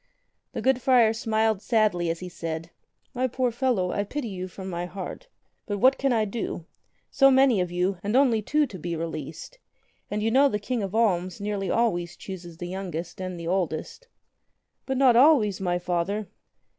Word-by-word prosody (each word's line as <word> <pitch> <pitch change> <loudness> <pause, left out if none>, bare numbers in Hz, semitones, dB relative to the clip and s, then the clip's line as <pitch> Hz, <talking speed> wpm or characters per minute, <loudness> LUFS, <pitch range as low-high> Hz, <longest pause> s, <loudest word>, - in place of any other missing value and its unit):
The - - -4
good 260 -1 +2
friar 235 -3 +5
smiled 220 -2 0
sadly 210 -8 +1
as 165 +1 -3
he 180 - -5
said: 165 -1 -5 0.4
"My 255 0 0
poor 250 0 0
fellow, 235 -7 0
I 205 - -1
pity 245 +3 -4
you 185 -2 -5
from 190 +1 -9
my 175 -1 -3
heart. 195 - -7 0.4
But 205 - -2
what 260 +6 +4
can 275 -1 +1
I 225 -3 +2
do? 200 -5 -4 0.5
So 275 -1 +6
many 265 -6 +4
of 180 - -1
you, 180 +1 0
and 205 +3 -2
only 255 -5 +4
two 300 +7 +2
to 205 -9 -9
be 170 +1 -3
released! 160 - -6 0.5
And 210 0 -2
you 225 - +1
know 275 +3 +5
the 210 - -1
King 235 +3 -3
of 195 +1 -4
Alms 185 -5 +1
nearly 200 -2 -2
always 175 -7 0
chooses 175 -4 -9
the 175 - -6
youngest 175 -2 -5
and 185 -2 -5
the 170 - -6
oldest." 180 - -2 0.8
"But 265 -1 -1
not 260 -3 +5
always, 235 -8 +5
my 175 -2 0
Father." 180 +4 -2
205 Hz, 185 wpm, -26 LUFS, 175-240 Hz, 0.8 s, So